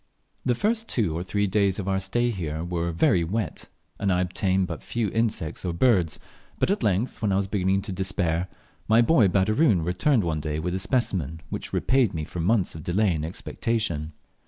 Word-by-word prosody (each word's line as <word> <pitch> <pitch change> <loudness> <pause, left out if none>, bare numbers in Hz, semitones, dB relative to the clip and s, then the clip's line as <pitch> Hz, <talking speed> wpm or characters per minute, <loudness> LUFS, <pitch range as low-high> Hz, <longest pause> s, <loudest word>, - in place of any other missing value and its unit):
The 125 - +1
first 225 - 0
two 100 -10 0
or 85 - -2
three 100 +3 0
days 100 -1 +1
of 100 -2 -4
our 95 -1 +1
stay 120 +6 0
here 80 -6 -4
were 85 -1 -2
very 85 +1 +3
wet, 95 +1 -3 0.3
and 100 -2 +1
I 90 0 +2
obtained 95 +1 +1
but 80 -7 -6
few 105 - -2
insects 110 -9 -1
or 90 -2 -2
birds, 90 -5 +3 0.4
but - - +1
at 200 - 0
length, 105 +2 0
when 105 -3 +1
I - - +2
was 100 0 +1
beginning 95 -1 +1
to - - -6
despair, 90 -2 0 0.4
my 110 +2 +5
boy 120 -6 +5
Baderoon 100 - +2
returned 110 - +2
one 80 -3 -1
day 75 0 -3
with 90 +3 -2
a 95 - -1
specimen 95 - -1
which - - -5
repaid 130 -8 +2
me 80 -1 -3
for 90 - -7
months 95 +3 +1
of 80 - -8
delay 95 +4 +1
and 75 -2 -3
expectation. 85 -2 -2
95 Hz, 200 wpm, -25 LUFS, 85-110 Hz, 0.4 s, my